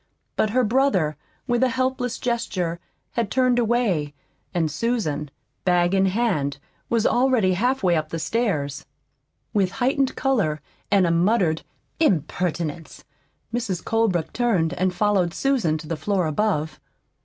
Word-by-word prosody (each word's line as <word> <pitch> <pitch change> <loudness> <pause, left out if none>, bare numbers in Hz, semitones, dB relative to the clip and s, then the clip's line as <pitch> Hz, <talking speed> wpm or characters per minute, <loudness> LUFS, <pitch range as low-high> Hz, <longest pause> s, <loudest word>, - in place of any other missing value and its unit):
But 215 - +2
her 250 +4 +2
brother, 215 - +2 0.3
with 240 0 +1
a 260 - +4
helpless 255 -1 -1
gesture, 185 -8 -2 0.3
had 230 -4 -1
turned 255 0 +2
away, 210 -11 +1 0.4
and 165 -3 0
Susan, 155 - -1 0.3
bag 175 0 +2
in 195 0 +3
hand, 185 -10 0 0.3
was 230 -2 +1
already 240 -7 +3
halfway 220 -3 +1
up 155 -1 -1
the 165 - -3
stairs. 160 - -1 0.7
With 195 -3 +1
heightened 265 +3 +1
color 205 - +1 0.3
and 200 -3 +4
a 170 - +2
muttered 170 -2 +2 0.4
"Impertinence!" 170 - -1 0.5
Mrs. 225 -7 -2
Colebrook 220 -8 0
turned 205 -10 +1
and 185 +1 0
followed 185 -2 +1
Susan 245 - +1
to 155 0 -10
the 165 - -2
floor 190 +2 0
above. 155 -1 -1
195 Hz, 130 wpm, -23 LUFS, 165-240 Hz, 0.7 s, a